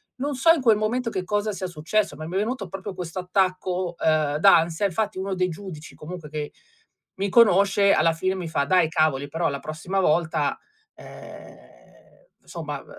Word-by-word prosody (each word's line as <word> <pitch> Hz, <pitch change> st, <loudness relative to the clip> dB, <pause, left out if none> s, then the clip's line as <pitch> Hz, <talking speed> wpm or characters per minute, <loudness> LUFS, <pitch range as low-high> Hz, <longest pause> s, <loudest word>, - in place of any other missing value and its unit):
Non 280 Hz, +2 st, -3 dB
so 330 Hz, +6 st, +5 dB
in 330 Hz, -, +2 dB
quel 225 Hz, -4 st, +4 dB
momento 230 Hz, +3 st, -1 dB
che 185 Hz, -4 st, -3 dB
cosa 210 Hz, +2 st, -1 dB
sia 190 Hz, -2 st, -4 dB
successo, 180 Hz, +6 st, -1 dB
ma 155 Hz, -, -7 dB
mi 170 Hz, +3 st, -6 dB
è -, -, +2 dB
venuto 215 Hz, -1 st, -2 dB
proprio 195 Hz, +2 st, -6 dB
questo 180 Hz, -1 st, -6 dB
attacco, 185 Hz, -1 st, -1 dB
ehm, 155 Hz, -2 st, +1 dB
d'ansia, 170 Hz, +1 st, +4 dB
infatti 205 Hz, +1 st, -1 dB
uno 195 Hz, +1 st, -3 dB
dei 185 Hz, 0 st, 0 dB
giudici 165 Hz, -3 st, -9 dB
comunque 160 Hz, -1 st, -9 dB
che 150 Hz, -1 st, -5 dB, 0.6 s
mi 200 Hz, +1 st, -2 dB
conosce 200 Hz, -2 st, +5 dB
alla 165 Hz, +1 st, +3 dB
fine 185 Hz, +4 st, -1 dB
mi 180 Hz, -3 st, -5 dB
fa: 160 Hz, -3 st, 0 dB
"Dai 180 Hz, +1 st, +3 dB
cavoli, 155 Hz, -4 st, +1 dB
però 165 Hz, +3 st, -1 dB
la 140 Hz, -1 st, -4 dB
prossima 160 Hz, +6 st, -4 dB
volta, 160 Hz, -4 st, +1 dB, 0.4 s
ehm, -, -, -15 dB
somma, -, -, -6 dB
ehm, -, -, -20 dB
185 Hz, 180 wpm, -24 LUFS, 160-200 Hz, 0.6 s, so